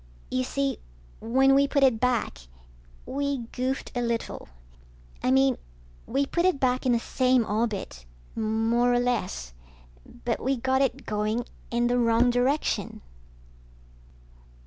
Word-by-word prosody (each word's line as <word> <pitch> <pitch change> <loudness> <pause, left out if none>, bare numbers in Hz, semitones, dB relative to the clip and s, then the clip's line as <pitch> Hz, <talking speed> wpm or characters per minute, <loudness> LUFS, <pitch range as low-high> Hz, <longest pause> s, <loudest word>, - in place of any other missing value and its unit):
You 255 0 0
see, 275 0 -2 0.4
when 265 +4 +3
we 280 +1 +4
put 280 0 +1
it 255 -5 +4
back, 245 - 0 0.7
we 280 -1 -2
goofed 260 +1 -3
a 245 - -1
little. 235 -1 -3 0.7
I - - 0
mean, 265 -1 +3 0.5
we 275 +3 +1
put 340 +5 -1
it 365 -6 +2
back 255 0 +1
in - - +4
the 235 - +4
same 255 0 +2
orbit, 210 - -2 0.3
more 225 +2 +1
or 245 - +3
less, 225 - -2 0.7
but 235 - 0
we 265 +1 0
got 265 +2 +1
it 270 0 -1
going 215 +3 -1 0.2
in 240 0 +1
the 245 +1 +2
wrong 235 +1 +3
direction. 255 +5 0
245 Hz, 135 wpm, -26 LUFS, 230-265 Hz, 0.7 s, we